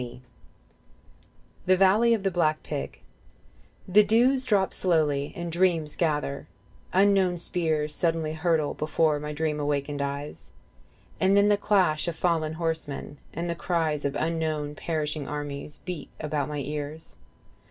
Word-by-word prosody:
34 125 +1 -10 1.5
THE 185 0 +5
VALLEY 210 +5 +5
OF 210 - -5
THE 195 - +1
BLACK 155 -3 +1
PIG 70 - -5 0.9
The 195 +3 +6
dews 250 +5 +3
drop 200 -5 +2
slowly 150 -5 +1
and 170 0 -4
dreams 165 -3 +1
gather: 150 -3 -1 0.4
unknown 190 -2 +3
spears 160 -3 -1
Suddenly 165 -1 0
hurtle 160 -2 +1
before 155 0 +1
my 150 0 -5
dream 150 0 -1
awakened 145 0 -1
eyes, 140 +1 -5 0.7
And 195 +1 +4
then 200 +1 +5
the 205 - +5
clash 185 -6 +2
of 170 - -2
fallen 160 -2 0
horsemen 160 -3 -4
and 170 +2 -4
the 170 - -1
cries 165 -4 -1
Of 140 - -1
unknown 155 -2 -1
perishing 150 -2 -3
armies 145 0 -5
beat 175 -6 -5
about 150 -2 -2
my 150 - -4
ears. 150 +3 -6
160 Hz, 140 wpm, -27 LUFS, 150-180 Hz, 1.5 s, The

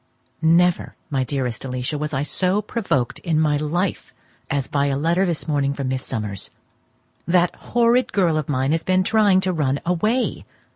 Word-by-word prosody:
Never, 170 +2 +3 0.2
my 135 -2 +1
dearest 125 -3 -3
Alicia, 125 +2 -3
was 150 +1 -3
I 140 -1 -1
so 185 +6 +1
provoked 195 - -2
in 160 -3 0
my 150 -2 +2
life 170 +5 -2 0.3
as 140 -2 0
by 140 -1 0
a 135 -1 0
letter 170 +6 +1
this 170 -2 -2
morning 140 -2 0
from 140 -2 -3
Miss 130 0 -2
Summers. 105 -5 -4 0.8
That 175 0 +2
horrid 240 +1 +1
girl 175 -5 +2
of 155 -2 -2
mine 135 0 0
has 165 +1 0
been 185 0 +2
trying 205 -2 +3
to 185 -1 0
run 140 -4 0
away. 215 +9 0
155 Hz, 175 wpm, -22 LUFS, 140-185 Hz, 0.8 s, Never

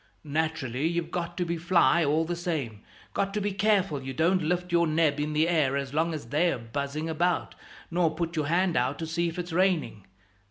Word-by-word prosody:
Naturally, 150 -3 -1
you've 170 0 -2
got 175 -1 -4
to 180 - 0
be 170 0 -2
fly, 170 0 +3
all 155 +2 +2
the 175 +1 -2
same. 155 - -3 0.3
Got 195 0 -1
to - - +1
be 205 0 -1
careful 195 -7 +1
you 135 0 -6
don't 180 +6 +2
lift 180 +2 -1
your 170 -1 +3
neb 155 -2 +2
in 150 +1 -1
the 155 +2 +3
air 150 -6 +2
as 140 -1 -4
long 160 +3 +1
as 150 -7 -6
they're 165 +4 +2
buzzing 140 +7 -4
about, 170 +2 0 0.4
nor 165 -2 +1
put 170 +1 -3
your 155 -2 0
hand 175 +2 +2
out 125 +3 +1
to 165 - -4
see 170 +2 -1
if 165 - -5
it's 175 -1 -4
raining. 165 - +1
165 Hz, 210 wpm, -27 LUFS, 150-175 Hz, 0.4 s, fly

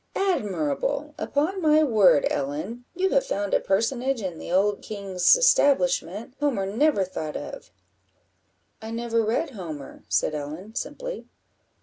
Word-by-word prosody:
admirable! 310 - -1
upon 340 +7 -1
my 310 -1 +5
word, 210 - +5
Ellen, 155 - -3
you 375 +2 +1
have 275 - +3
found 200 0 -3
a - - +5
personage 240 +6 0
in 185 -6 -5
the - - -7
old 200 +2 +2
king's 195 - +2
establishment 235 - +2
Homer 270 -10 0
never 225 +2 +2
thought 155 -4 -5
of." - - -8 1.1
"I 220 - -7
never 230 0 0
read 240 +8 -1
Homer," 160 - -8
said - - +1
Ellen, 155 +8 -6
simply. - - -5
220 Hz, 130 wpm, -25 LUFS, 185-285 Hz, 1.1 s, my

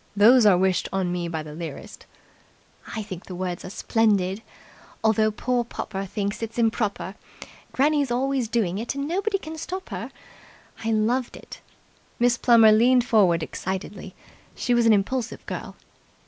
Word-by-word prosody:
"Those 225 +3 +6
are 190 -3 +6
wished 185 0 +1
on 190 -2 -1
me 175 -1 -2
by 160 -2 -4
the 150 -1 -9
lyrist." 160 -3 -8 0.9
"I 220 - -3
think 185 -3 -8
the 185 - -7
words 180 -1 -4
are - - -7
splendid. 200 -2 +1 0.6
Although 220 0 +3
poor 245 +3 -1
popper 195 -4 -5
thinks 200 +2 -3
its 225 +1 -5
improper, 220 -4 0 0.6
Granny's 285 0 +2
always 260 0 0
doing 205 -5 0
it 235 +4 -4
and 280 0 -3
nobody 395 +5 0
can 320 -4 -8
stop 375 +3 -6
her! - - -5 0.7
I 225 - -1
loved 235 +4 0
it." - - -12 0.6
Miss 240 0 +3
Plummer 230 -2 +6
leaned 240 +3 +4
forward 190 -9 +3
excitedly. 190 +2 -6 0.4
She 245 - 0
was 240 -1 +3
an 225 - +7
impulsive 230 +4 -1
girl. - - -6
220 Hz, 155 wpm, -24 LUFS, 190-245 Hz, 0.9 s, an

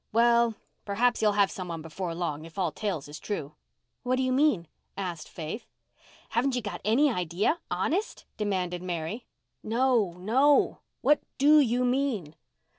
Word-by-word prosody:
Well, 235 0 +4 0.3
perhaps 240 +4 +1
he'll 210 -1 +3
have 200 -1 +3
some 185 -1 -6
one 165 -2 -5
before 165 +1 -4
long, 160 -3 -3
if 165 +2 -13
all 180 -4 +1
tales 175 -5 -3
is 150 +1 -9
true." 155 -8 -4 0.5
"What 250 0 +1
do 260 - 0
you 255 - +1
mean?" 255 - +2 0.3
asked 175 -5 -4
Faith. 165 +8 -6 0.6
"Haven't 255 +2 +1
you 245 - 0
got 200 -4 -5
any 265 +8 +4
idea—honest?" 200 - -1
demanded 185 -4 -1
Mary. 180 +5 -4 0.3
"No, 230 -4 +2
no. 260 +10 +3 0.2
What 295 - +4 0.2
do 300 +2 +6
you 250 -2 +2
mean?" 245 - 0
210 Hz, 150 wpm, -28 LUFS, 175-250 Hz, 0.6 s, do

